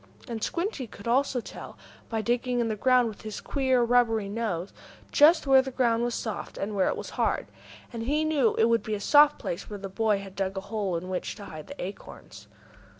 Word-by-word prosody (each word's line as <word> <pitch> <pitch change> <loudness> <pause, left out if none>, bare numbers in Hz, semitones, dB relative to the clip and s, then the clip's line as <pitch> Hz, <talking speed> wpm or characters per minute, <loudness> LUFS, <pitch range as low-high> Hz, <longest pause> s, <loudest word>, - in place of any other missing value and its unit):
And 225 -2 -5
Squinty 340 - -2
could 205 0 -11
also 255 +1 +2
tell, - - -10 0.3
by 225 -1 -1
digging 245 +2 0
in 235 -1 +1
the 215 - -1
ground 250 +2 +3
with 215 -2 -8
his 215 -1 -6
queer, 260 -3 +1
rubbery 230 -3 +2
nose, 200 -5 -3 0.4
just 315 +3 +6
where 270 -1 +6
the 265 - -5
ground 240 -3 +1
was 240 -1 -1
soft 220 -3 -5
and 205 +1 -3
where 190 - +2
it - - -1
was - - -7
hard. - - +1 0.5
And 230 - -4
he 295 +6 0
knew 285 -7 +2
it 225 - +4
would 230 -1 +3
be 210 0 -3
soft 290 +8 +6
at - - -24
the - - -17
place 170 - -4
where 205 - -5
the 195 0 -7
boy 215 +1 +1
had 195 -1 -9
dug 190 +1 -2
a - - -2
hole 200 -3 -2
in 175 +2 -6
which 185 -1 -3
to 205 - -10
hide 155 -4 -9
the 280 - -10
acorns. 190 +3 -9
225 Hz, 225 wpm, -27 LUFS, 200-255 Hz, 0.5 s, just